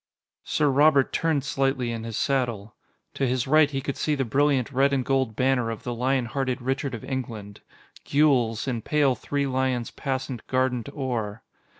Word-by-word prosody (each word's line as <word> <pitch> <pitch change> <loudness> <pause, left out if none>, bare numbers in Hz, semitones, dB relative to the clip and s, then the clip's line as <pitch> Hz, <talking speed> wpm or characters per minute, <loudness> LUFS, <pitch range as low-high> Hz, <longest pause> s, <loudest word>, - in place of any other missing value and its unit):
Sir 150 - +1
Robert 140 0 +4
turned 160 -4 +1
slightly 135 -3 0
in 115 -1 -5
his 115 -2 -4
saddle. 120 -6 -1 0.4
To 135 - 0
his 125 -1 0
right, 155 +1 +5
he 135 -2 -3
could 140 +1 -4
see 150 - 0
the 135 -2 -1
brilliant 140 +1 +1
red 140 +1 +2
and 130 -2 0
gold 130 -5 0
banner 130 -2 +1
of 115 - -6
the 120 - -3
lion 130 +1 0
hearted 130 +1 -2
Richard 135 +1 -2
of 115 - -9
England 110 -6 -5 0.4
gules, 130 -6 +2
in 120 -3 -2
pale 145 +2 +2
three 140 +2 -2
lions 130 -2 -1
passant 130 -3 -4
guardant 130 -1 0
or. 115 -7 -3
130 Hz, 175 wpm, -25 LUFS, 120-140 Hz, 0.4 s, right